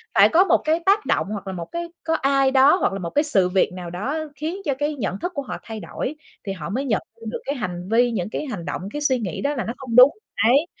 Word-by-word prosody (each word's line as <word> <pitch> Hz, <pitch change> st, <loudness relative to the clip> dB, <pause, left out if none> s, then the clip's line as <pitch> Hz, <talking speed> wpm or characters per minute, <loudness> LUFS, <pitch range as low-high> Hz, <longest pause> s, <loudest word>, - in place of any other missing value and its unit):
phải -, -, +7 dB
có 345 Hz, +3 st, +5 dB
một 370 Hz, -, +4 dB
cái 315 Hz, +2 st, +2 dB
tác 405 Hz, +2 st, +3 dB
động, -, -, +1 dB
hoặc 205 Hz, -2 st, -5 dB
là 190 Hz, -, -3 dB
một 170 Hz, -2 st, -5 dB
cái 340 Hz, 0 st, -3 dB, 0.2 s
có 325 Hz, -, 0 dB
ai 275 Hz, -1 st, +2 dB
đó, 270 Hz, +3 st, +6 dB
hoặc 365 Hz, -, 0 dB
là 195 Hz, -, -3 dB
một 170 Hz, -2 st, -4 dB
cái 295 Hz, -, +2 dB
sự 195 Hz, -12 st, +2 dB
việc 185 Hz, 0 st, +2 dB
nào 180 Hz, -2 st, -7 dB
đó 210 Hz, -, -3 dB, 0.2 s
khiến 320 Hz, +7 st, -4 dB
cho 285 Hz, -, +1 dB
cái 295 Hz, +1 st, -1 dB
nhận 200 Hz, -7 st, -3 dB
thức 355 Hz, +1 st, -4 dB
của 285 Hz, -, -1 dB
họ 270 Hz, -, -6 dB
thay 220 Hz, -1 st, -7 dB
đổi, 270 Hz, +6 st, -5 dB, 0.3 s
thì 195 Hz, -, -2 dB
họ 170 Hz, -4 st, -6 dB
mới 255 Hz, +8 st, -2 dB
nhận 220 Hz, -6 st, +1 dB, 0.2 s
ra -, -, -10 dB
được -, -, -4 dB
cái 280 Hz, -, -2 dB
hành 180 Hz, -6 st, -5 dB
vi, 240 Hz, +2 st, +4 dB
những 190 Hz, -4 st, -2 dB
cái 300 Hz, -, -4 dB
hành 200 Hz, -10 st, -5 dB
động, -, -, -4 dB
cái 295 Hz, -, -3 dB
suy 265 Hz, -3 st, +2 dB
nghĩ 190 Hz, -8 st, -4 dB
đó 290 Hz, +1 st, 0 dB
là 240 Hz, -, -2 dB
nó 230 Hz, -, -3 dB
không 245 Hz, -4 st, -5 dB
đúng. 250 Hz, +3 st, +9 dB, 0.4 s
Đấy, 275 Hz, +6 st, +4 dB
255 Hz, 290 wpm, -22 LUFS, 195-295 Hz, 0.4 s, đúng